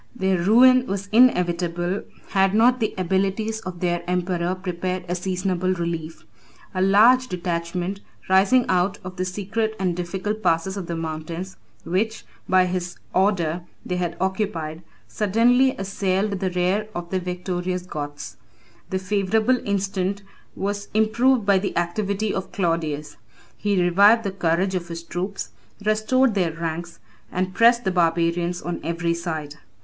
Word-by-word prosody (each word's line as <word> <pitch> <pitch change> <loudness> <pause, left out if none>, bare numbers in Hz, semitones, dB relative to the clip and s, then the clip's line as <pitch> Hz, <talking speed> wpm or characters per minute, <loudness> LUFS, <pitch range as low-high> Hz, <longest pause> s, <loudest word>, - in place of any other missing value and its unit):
Their 190 -4 +1
ruin 250 +7 +6
was 195 0 -3
inevitable, 175 -5 +2 0.3
had 195 0 +2
not 245 +3 +4
the 220 - -1
abilities 195 +4 0
of 185 -4 -8
their 175 -1 0
emperor 180 0 0
prepared 185 0 -3
a 175 - -1
seasonable 185 0 -1
relief. 165 -6 -4 0.5
A 185 - -1
large 225 +7 +5
detachment, 180 +1 -3 0.3
rising 195 +7 +4
out 185 +2 +1
of 185 0 -8
the 185 - -1
secret 210 +4 -2
and 180 -3 0
difficult 190 +5 -3
passes 165 +1 +1
of 190 -4 -5
the 170 - -3
mountains, 165 +3 -5 0.3
which, 215 +6 -1 0.2
by 185 -1 +5
his 180 -1 -3 0.2
order, 180 -4 +1 0.2
they 180 - -2
had 175 -2 -2
occupied, 180 -5 -2 0.3
suddenly 240 +5 +3
assailed 195 +1 -1
the 190 -1 0
rear 180 +4 0
of 175 0 -5
the 190 - +1
victorious 180 0 -3
Goths. 145 -4 -6 0.5
The 190 - -1
favorable 210 +5 +1
instant 195 0 -1 0.3
was 205 +1 -3
improved 230 +2 +3
by 200 -1 +4
the 195 -2 -3
activity 200 +4 -1
of 190 - -4
Claudius. 155 -5 -2 0.4
He 205 -2 0
revived 200 +6 +5
the 200 - -2
courage 185 +1 0
of 175 -2 -2
his 170 0 -6
troops, 185 +4 -4 0.3
restored 215 +4 +2
their 180 -5 0
ranks, 165 +1 -5 0.3
and 185 +1 -2
pressed 235 +2 +5
the 190 - 0
barbarians 170 0 +1
on 175 0 -3
every 170 0 -1
side. 160 -3 -5
185 Hz, 145 wpm, -23 LUFS, 175-205 Hz, 0.5 s, ruin